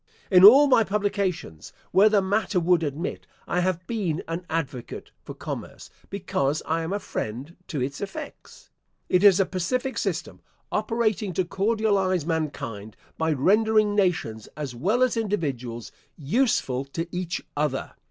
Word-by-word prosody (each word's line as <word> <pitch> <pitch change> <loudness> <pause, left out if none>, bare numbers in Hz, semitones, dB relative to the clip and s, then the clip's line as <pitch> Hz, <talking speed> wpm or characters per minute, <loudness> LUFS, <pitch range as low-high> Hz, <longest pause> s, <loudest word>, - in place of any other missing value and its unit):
In 185 -1 +7
all 265 +9 +10
my 255 -5 +5
publications, 200 - -2 0.2
where 200 +4 +6
the 205 -2 +3
matter 200 0 +1
would 175 0 +3
admit, 155 +2 -4 0.2
I 175 - 0
have 180 -1 -1
been 185 -8 -2
an 170 +2 -5
advocate 135 -7 -4
for - - -9
commerce, - - -7 0.2
because 155 -7 -1
I 165 +1 0
am 165 +2 -4
a 200 - 0
friend 135 - -5
to 150 - -3
its 140 +3 -3
effects. 200 -1 -8 0.4
It 180 +1 +3
is 200 -2 +7
a 195 - +4
pacific 250 +10 -2
system, - - -3 0.3
operating 220 -4 0
to 185 +1 0
cordialise 195 -3 +1
mankind, 140 -10 -4 0.2
by 160 0 +1
rendering 210 +8 +3
nations, 175 - 0
as 145 -4 -4
well 200 - +1
as 255 -2 +2
individuals, 140 - -3 0.3
useful 150 - 0
to 165 +5 -4
each 180 -1 -3
other. 145 -2 -1
180 Hz, 145 wpm, -25 LUFS, 150-205 Hz, 0.4 s, all